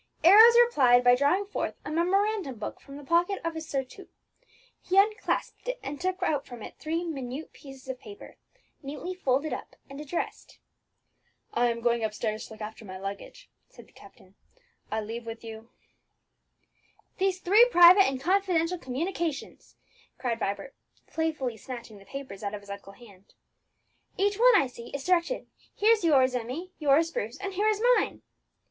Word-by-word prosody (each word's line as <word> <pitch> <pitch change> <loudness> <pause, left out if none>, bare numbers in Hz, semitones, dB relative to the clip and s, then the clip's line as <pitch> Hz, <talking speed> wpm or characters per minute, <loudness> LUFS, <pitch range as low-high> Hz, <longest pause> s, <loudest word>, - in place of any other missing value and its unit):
Arrows 440 +7 +9
replied 260 - +5
by 245 0 +6
drawing 285 +10 +2
forth 405 - -4
a - - -5
memorandum 370 - 0
book 210 -1 -7
from 275 0 -12
the 290 - -10
pocket 345 +6 +1
of 335 0 -2
his 320 0 -7
surtout. 270 +7 -5 0.7
He 370 - -1
unclasped 425 +4 +1
it, - - -3
and 280 +1 -6
took 370 +1 -2
out 290 -6 0
from 240 -3 -10
it - - -11
three 330 +2 -2
minute 280 -3 -6
pieces 270 -2 -13
of 260 -1 -5
paper, 205 -2 -12 0.4
neatly 300 +6 -6
folded 280 -4 0
up - - -7 0.2
and 275 +2 -8
addressed. 300 +3 -5 1.0
"I 240 +1 +2
am 235 0 -2
going 235 -1 +1
upstairs 215 0 -3
to - - -12
look 215 - -13
after 220 +1 -7
my 190 -2 -8
luggage," 200 - -8 0.2
said - - -15
the - - -26
captain; - - -18 0.6
"I 220 - -1
leave 230 +2 -7
with 225 0 -7
you 225 0 -10 0.7
" - - -40
"These 380 -1 +1
three 410 +6 +6
private 360 -1 +8
and 265 -1 -2
confidential 360 +1 +1
communications!" 320 +4 -4 0.4
cried 235 -3 -2
Vibert, 200 +5 -3 0.3
playfully 305 -8 -2
snatching 235 -3 -9
the 195 - -17
papers 265 -8 -8
out 205 0 -4
of 205 - -9
his 200 0 -11
uncle's 200 0 -10
hand. 200 -5 -18 0.8
"Each 405 +1 +1
one, - - +6
I 385 - +5
see, 240 -2 -10
is 280 - -5
directed: 365 +7 +1 0.3
here's 435 0 +3
yours, 265 -6 +4
Emmie; 255 +10 -4
yours, 305 +2 +3
Bruce; 230 -1 -4
and 390 0 -5
here 410 +3 0
is 430 -1 +2 0.2
mine!" - - -2
280 Hz, 170 wpm, -27 LUFS, 235-365 Hz, 1.0 s, Arrows